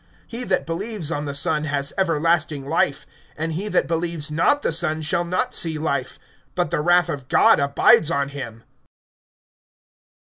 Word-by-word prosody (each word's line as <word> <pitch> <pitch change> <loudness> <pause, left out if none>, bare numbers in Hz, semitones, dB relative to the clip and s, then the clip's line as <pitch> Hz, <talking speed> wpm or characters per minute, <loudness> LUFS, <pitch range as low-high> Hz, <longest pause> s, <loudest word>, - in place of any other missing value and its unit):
(36)He 245 +2 -4
that 185 -1 0
believes 175 0 -3
on 150 -2 -3
the 140 - -4
Son 155 0 0
has 140 -2 -2
everlasting 165 -5 0
life; 145 -2 0 0.3
and 160 +1 -3
he 190 +6 -3
that - - +1
believes 165 -2 -3
not 290 - +2
the - - 0
Son 160 -1 0
shall 170 +3 0
not 185 +9 -2
see 160 -2 0
life, 140 -4 -2 0.4
but 175 -3 -1
the - - 0
wrath 175 +1 +3
of 140 -6 -5
God - - +5
abides 140 +2 +4
on 140 -4 0
him. 120 -5 -8
160 Hz, 160 wpm, -22 LUFS, 145-175 Hz, 0.4 s, God